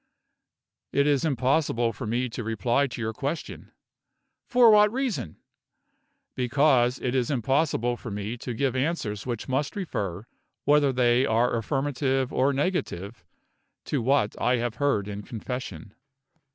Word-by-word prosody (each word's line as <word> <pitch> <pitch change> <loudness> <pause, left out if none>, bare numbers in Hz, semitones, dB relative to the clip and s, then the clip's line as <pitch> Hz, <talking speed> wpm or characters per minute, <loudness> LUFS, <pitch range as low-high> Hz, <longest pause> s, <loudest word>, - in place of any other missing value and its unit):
"It 140 - +2
is 145 -3 +2
impossible 130 -4 +1
for 115 - -6
me 120 +3 0
to 120 0 -6
reply 120 +5 +1
to 120 - -8
your 110 -1 -2
question." 140 +7 -5 0.8
"For 245 -3 +6
what 210 0 +6
reason?" 245 - -3 1.0
"Because 130 -1 +2
it 125 - -2
is 125 -3 +1
impossible 130 -2 +1
for 120 - -8
me 105 +2 -4
to 120 0 -6
give 135 0 0
answers 130 -7 -2
which 120 -3 -4
must 135 +5 -1
refer, 105 - -4 0.4
whether 145 -1 +4
they 125 +1 +3
are 115 +2 +2
affirmative 135 +1 -1
or 135 +2 +3
negative, 135 - -2 0.6
to 145 - -1
what 130 -3 +2
I 125 - +3
have 120 -1 -3
heard 120 -9 +1
in 105 0 -5
confession." 115 -1 -6
125 Hz, 140 wpm, -26 LUFS, 115-140 Hz, 1.0 s, For